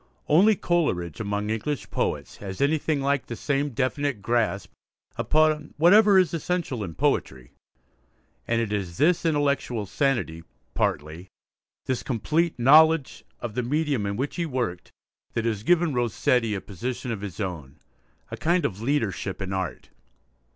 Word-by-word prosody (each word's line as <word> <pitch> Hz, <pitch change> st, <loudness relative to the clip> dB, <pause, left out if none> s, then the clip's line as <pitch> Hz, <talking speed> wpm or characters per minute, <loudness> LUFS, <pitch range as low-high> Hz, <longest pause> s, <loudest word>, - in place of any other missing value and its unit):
Only 200 Hz, +8 st, +5 dB
Coleridge 130 Hz, -, -1 dB
among 105 Hz, 0 st, -2 dB
English 120 Hz, +5 st, -3 dB
poets -, -, -2 dB
has 95 Hz, -2 st, -7 dB
anything 150 Hz, 0 st, +1 dB
like 140 Hz, -1 st, 0 dB
the 120 Hz, -, -5 dB
same 145 Hz, +3 st, -1 dB
definite 135 Hz, 0 st, -1 dB
grasp 110 Hz, -3 st, -1 dB, 0.4 s
upon 155 Hz, -1 st, +1 dB
whatever 200 Hz, +5 st, +6 dB
is 180 Hz, -4 st, +3 dB
essential 165 Hz, -8 st, -2 dB
in 85 Hz, -4 st, -7 dB
poetry. 65 Hz, -3 st, -1 dB, 1.0 s
And 115 Hz, 0 st, +1 dB
it 110 Hz, -3 st, -1 dB
is 95 Hz, -5 st, -3 dB
this 170 Hz, +2 st, +3 dB
intellectual 140 Hz, -7 st, 0 dB
sanity 115 Hz, -, -1 dB, 0.3 s
partly, 80 Hz, +5 st, -2 dB, 0.6 s
this 130 Hz, -2 st, -1 dB
complete 155 Hz, +8 st, 0 dB
knowledge 155 Hz, +4 st, +5 dB, 0.2 s
of 120 Hz, -3 st, -5 dB
the 125 Hz, -, -1 dB
medium 140 Hz, -4 st, 0 dB
in 100 Hz, -, -2 dB
which 135 Hz, +7 st, -3 dB
he 170 Hz, -, 0 dB
worked, 120 Hz, -, -3 dB, 0.4 s
that 115 Hz, -, -1 dB
has 110 Hz, -3 st, -1 dB
given 170 Hz, +4 st, +2 dB
Rossetti 120 Hz, -1 st, +1 dB
a 95 Hz, -, -4 dB
position 120 Hz, +6 st, -5 dB
of 110 Hz, -4 st, -4 dB
his 100 Hz, -1 st, -7 dB
own, 80 Hz, -8 st, -5 dB, 0.5 s
a -, -, -5 dB
kind 175 Hz, +2 st, +1 dB
of 100 Hz, 0 st, -3 dB
leadership 115 Hz, -7 st, -1 dB
in 95 Hz, -1 st, -4 dB
art. 95 Hz, -1 st, -4 dB
125 Hz, 145 wpm, -25 LUFS, 100-150 Hz, 1.0 s, whatever